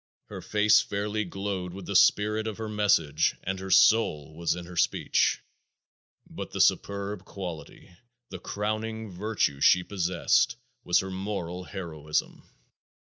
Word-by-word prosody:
Her - - -7
face 105 0 +4
fairly 105 +1 -3
glowed 95 -1 -4
with 95 -2 -8
the 100 - -4
spirit 105 +4 +3
of 110 - -5
her 110 -1 -5
message 90 -8 +2
and 95 0 -3
her 95 0 -7
soul 95 -6 +4
was 85 0 -1
in 90 -1 -7
her 90 +1 -11
speech. 80 - +1 0.8
But - - -7
the - - -6
superb 100 -1 +1
quality, 90 -4 -8 0.4
the 95 - -7
crowning 110 +2 -4
virtue 90 -7 -1
she 90 +4 +5
possessed, 85 -10 +1 0.3
was 90 - +3
her 95 0 -6
moral 95 -2 -4
heroism. 80 -6 -4
95 Hz, 135 wpm, -27 LUFS, 85-105 Hz, 0.8 s, she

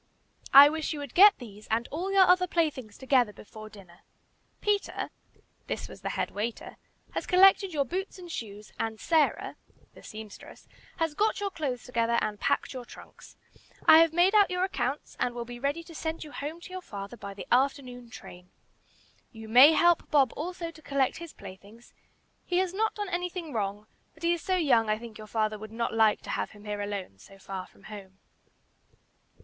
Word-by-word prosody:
"I 280 +1 +11
wish 315 +1 -2
you 300 - -6
would 285 -3 -8
get 400 +3 +8
these 215 -4 -12
and 230 +2 0
all 360 +6 -3
your 390 -1 +6
other 365 0 +4
playthings 285 - -2
together 255 -4 +2
before 215 +1 -12
dinner. 185 -5 -16 0.6
Peter 415 -1 -1 0.6
(this - - -4
was - - -13
the - - -3
head - - -2
waiter) 220 +3 -5 0.3
has - - -4
collected 385 +1 +5
your 290 -4 0
boots 380 +9 -4
and 350 -2 -10
shoes, 210 -4 -7
and 220 -1 -3
Sarah 315 -3 +1 0.4
(the - - -15
seamstress) 215 -1 -11 0.3
has 325 -3 -1
got 430 +8 +1
your 400 -1 -2
clothes 275 -8 -4
together 235 -1 0
and 210 -1 -3
packed 280 - 0
your 255 -1 -6
trunks. - - -15 0.5
I 315 - +9
have 330 -1 +5
made 350 +4 +3
out 415 -2 +5
your 365 0 -1
accounts, 290 -7 -3
and 245 -1 -1
will 240 -1 -4
be 240 0 -9
ready 285 +6 -2
to 330 - -13
send 320 +1 -4
you 300 - -11
home 300 +5 -6
to 365 - -11
your 370 0 -6
father 200 - -8
by 200 -3 -9
the 195 - -8
afternoon 250 -2 0
train. 180 -5 -12 0.8
You 220 -2 -11
may 255 +8 +8
help 345 +1 +3
Bob 280 -6 +3
also 340 +1 -5
to 320 - -17
collect 275 -3 0
his 335 -1 -9
playthings; 200 +4 -14 0.5
he 355 - -1
has 370 -1 0
not 440 +3 0
done 415 -2 -4
anything 355 -3 -4
wrong, 205 -1 -3 0.3
but 320 - -17
he 340 0 +3
is 340 - -4
so 375 - 0
young 260 -11 +3
I 215 - +1
think 225 -1 -11
your 215 - -10
father 215 -1 -1
would 215 0 -9
not 230 0 -2
like 220 -1 +3
to - - -6
have - - -2
him 210 0 -15
here 205 -1 -4
alone 200 - -5
so 195 - -16
far 190 -1 -7
from - - -23
home." 195 -3 -11
265 Hz, 195 wpm, -28 LUFS, 215-340 Hz, 0.8 s, I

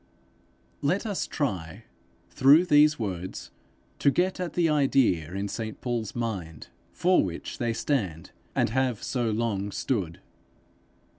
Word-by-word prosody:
Let 180 +10 0
us 205 -4 -2
try, 95 - -3 0.5
through 145 +7 +6
these 150 -2 +5
words, 95 -5 -5 0.5
to - - +4
get 185 +6 0
at 180 -4 -3
the 175 -2 +2
idea 135 - +2
in 100 +1 -2
St 110 +2 -5
Paul's 120 -4 -3
mind 95 - -4 0.2
for 180 +1 +3
which 85 -3 -6
they 120 -2 0
stand, 110 - -2 0.2
and - - +1
have 130 -3 0
so 120 -3 -1
long 105 -3 -1
stood. 95 -8 -2
115 Hz, 130 wpm, -27 LUFS, 100-145 Hz, 0.5 s, through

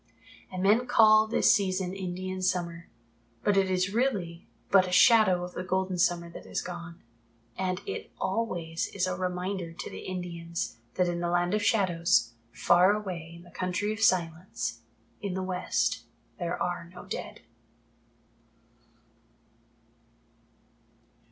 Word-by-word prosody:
And 185 0 -3
men 220 +5 +4
call 215 -2 +6
this 220 - +4
season 190 -2 0
Indian 185 0 -4
Summer, 170 -2 -2 0.5
but 205 - +3
it 195 -1 +3
is 185 +1 0
really 200 -9 -1 0.2
but 190 -2 +6
a - - -5
Shadow 190 -3 +6
of 180 0 -7
the - - -4
golden 185 0 -1
summer 175 -2 +2
that - - -10
has - - -2
gone. 175 -1 -8 0.5
And 185 0 -2
it - - -5
always 175 -6 -2
is 185 -2 +1
a 185 -1 -2
reminder 180 -1 -3
to - - -7
the - - -7
Indians 170 -6 -5 0.2
that 180 - +2
in 175 0 -1
the 175 0 -1
Land 175 +1 +1
of 210 - +1
Shadows, 175 - +2 0.2
far 180 - +4
away 180 -6 -5
in 170 - -13
the 175 - -16
Country 185 +4 -1
of 215 - -8
Silence 170 - 0 0.4
in 195 -3 -3
the 190 - -2
West, 185 -1 0 0.4
there 175 -1 -2
are 175 -1 -2
no 180 - -11
dead. - - -6
185 Hz, 140 wpm, -28 LUFS, 175-195 Hz, 0.5 s, call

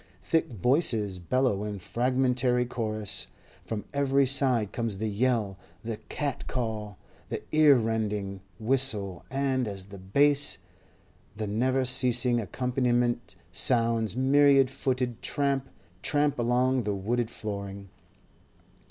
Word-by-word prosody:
Thick 165 -1 +1
voices 110 - +1
bellow 105 +2 0
in 105 -1 -4
fragmentary 125 +3 +1
chorus; 110 -4 -3 0.4
from 110 -2 -5
every 140 -1 +3
side 130 -6 +1
comes 115 -4 -2
the 110 +2 -2
yell, 105 -3 0 0.2
the 115 -1 -4
cat 145 -3 -3
call, 110 -5 -3 0.3
the - - -4
ear 155 -2 +6
rending 105 -4 -2 0.2
whistle; 110 -6 +1
and 135 -2 0
as 100 -2 -6
the 100 0 -11
bass, 140 +10 +2 0.8
the 110 - -2
never 130 +5 +1
ceasing 125 -1 +2
accompaniment, 120 -2 -1 0.2
sounds 115 -3 +2
myriad 135 0 +4
footed 125 -4 -2
tramp, 140 -2 -1 0.3
tramp 145 -3 +1
along 125 +2 +2
the 105 -3 -2
wooden 115 +5 -1
flooring. 100 -3 -6
120 Hz, 115 wpm, -28 LUFS, 105-130 Hz, 0.8 s, ear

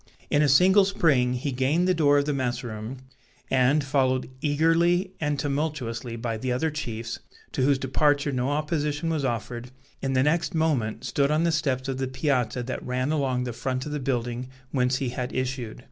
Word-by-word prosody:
In 145 - +4
a 150 - +4
single 190 +8 +6
spring 145 -10 +2
he 130 +3 -2
gained 135 +8 +1
the 185 - +4
door 145 -4 +4
of 140 - +2
the 150 - 0
mess 125 -2 -1
room, 110 +2 -6 0.5
and, 135 +3 +3
followed 130 -2 +1
eagerly 165 +5 +2
and 150 -1 0
tumultuously 140 -5 -2
by 115 -1 -3
the 125 +3 -2
other 155 +6 0
chiefs, 115 -6 -5 0.3
to - - -2
whose 140 +1 +4
departure 145 +2 +1
no 130 0 -1
opposition 150 +1 -1
was 155 -3 -1
offered, 120 0 -3 0.3
in 135 -1 -1
the 130 0 +3
next 165 +4 +1
moment 145 -9 0
stood 140 -1 +1
on 155 +2 +2
the 170 - +2
steps 135 -5 0
of 135 -1 -3
the 130 - -1
piazza 130 -3 0
that 130 +2 -5
ran 130 +3 -1
along 135 -5 0
the 120 -1 -4
front 130 +2 -3
of 150 - -5
the 150 - -2
building 125 -2 -2 0.2
whence 125 -1 +1
he 130 -1 -1
had 125 0 -4
issued. 130 -3 -3
135 Hz, 190 wpm, -26 LUFS, 125-150 Hz, 0.5 s, single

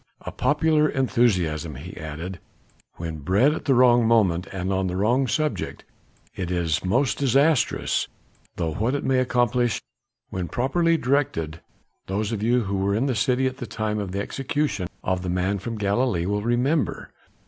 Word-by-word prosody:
A - - -6
popular 150 0 +2
enthusiasm," 95 - +1
he 90 +9 -9
added, 80 +3 -6 0.6
"when 80 -2 -5
bred 100 - +3
at - - -6
the 135 - +3
wrong 120 -2 +5
moment 100 -6 +3
and 95 0 -2
on 95 0 0
the 90 - -3
wrong 120 +7 +2
subject, 150 +8 -2 0.5
is 85 -3 -1
most 125 +9 +1
disastrous; 140 +1 +2 0.5
though 80 -2 -2
what 115 - 0
it 145 - -2
may 130 -1 +2
accomplish 120 -2 +1 0.5
when 90 -2 -3
properly 165 - +1
directed, 125 - -1 0.5
those 100 +3 -1
of 110 -3 -3
you 120 +3 +2
who 100 -1 -2
were 100 +1 +1
in 115 +5 +1
the 135 - +1
city 125 +4 +1
at 130 0 -2
the 125 - -6
time 110 -1 -2
of 100 -3 -4
the 100 - -3
execution 135 -5 -2 0.2
of 95 -1 0
the 90 - -4
man 90 +3 0
from 115 +3 -5
Galilee 100 -3 0
will 105 +2 0
remember. 125 +7 0
110 Hz, 165 wpm, -24 LUFS, 90-130 Hz, 0.6 s, wrong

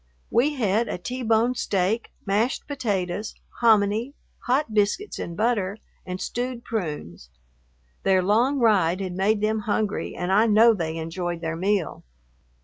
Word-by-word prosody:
We 285 +6 +2
had 225 -2 +1
a - - -3
T 250 +8 -5
bone 230 +1 +2
steak, 210 -1 -1 0.2
mashed 215 +6 0
potatoes, 210 -7 -2 0.2
hominy, 220 +3 +3 0.3
hot 255 -2 +1
biscuits 210 - 0
and 170 -1 -5
butter, 210 -3 0 0.3
and 180 0 -4
stewed 245 +2 -4
prunes. 150 - -5 0.7
Their 190 -1 +3
long 235 +9 +2
ride 195 -8 +3
had 185 -2 -4
made 205 +3 +1
them 215 +1 +1
hungry 210 0 -2
and 180 +1 -2
I 215 +4 +4
know 225 +2 +6
they 165 -5 -3
enjoyed 170 +1 -4
their 165 -1 -2
meal. 190 +1 -1
210 Hz, 140 wpm, -24 LUFS, 185-235 Hz, 0.7 s, know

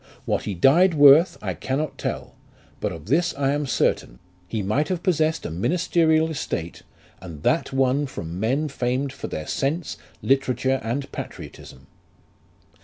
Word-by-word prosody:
What - - -1
he 100 - -3
died 165 - +4
worth 145 +4 +7
I - - -2
cannot 140 +3 -3
tell, - - -4 0.5
but - - -2
of 80 -3 -9
this 165 - +1
I 140 -1 +1
am 145 0 -1
certain, - - 0 0.3
he 110 0 -3
might 120 +10 0
have 180 -2 -3
possessed 160 -4 +1
a - - -4
ministerial 160 - +2
estate, 85 - -4 0.4
and 85 -5 -10
that 165 - +1
won 135 +2 +1
from 85 -7 -6
men 130 +9 0
famed 130 0 -2
for - - -6
their 80 - -5
sense, 145 - -2 0.3
literature, 130 -1 +1
and 125 +5 -3
patriotism. 65 - -9
135 Hz, 150 wpm, -23 LUFS, 110-155 Hz, 0.5 s, worth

